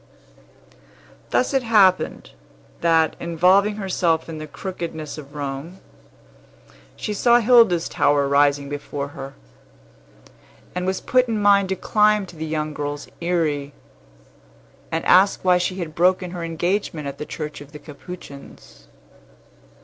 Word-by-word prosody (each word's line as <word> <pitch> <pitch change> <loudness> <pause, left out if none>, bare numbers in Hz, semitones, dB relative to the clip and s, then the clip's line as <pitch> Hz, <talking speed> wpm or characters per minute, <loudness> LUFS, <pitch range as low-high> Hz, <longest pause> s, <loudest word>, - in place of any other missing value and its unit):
Thus 255 - +1
it 270 - +2
happened, 205 -6 +2 0.5
that, 165 -1 +2
involving 185 +5 +3
herself 180 -5 0
in 160 -2 -7
the 155 - -7
crookedness 160 -2 -6
of 145 0 -13
Rome, 145 +5 -5 1.2
she 210 - -4
saw 240 +3 +4
Hilda's 230 -8 +4
tower 145 -1 +2
rising 140 0 +2
before 145 0 -5
her, 135 -1 -9 1.4
and 180 0 -3
was 190 0 -1
put 255 0 +2
in 225 -2 -1
mind 200 -2 +4
to 190 - 0
climb 210 +1 +2
to 175 - -14
the 160 0 -5
young 155 -1 -3
girl's 145 0 -5
eyry, 155 -5 -1 1.2
and 165 0 -2
ask 190 +2 +4
why 180 -1 +4
she 180 +1 -2
had 170 -4 -5
broken 180 +2 +1
her 175 -2 -6
engagement 165 -1 -2
at 140 - -7
the 150 - -4
church 150 -2 -6
of 145 0 -13
the 150 - -9
Capuchins. 140 - -12
170 Hz, 135 wpm, -22 LUFS, 145-190 Hz, 1.4 s, saw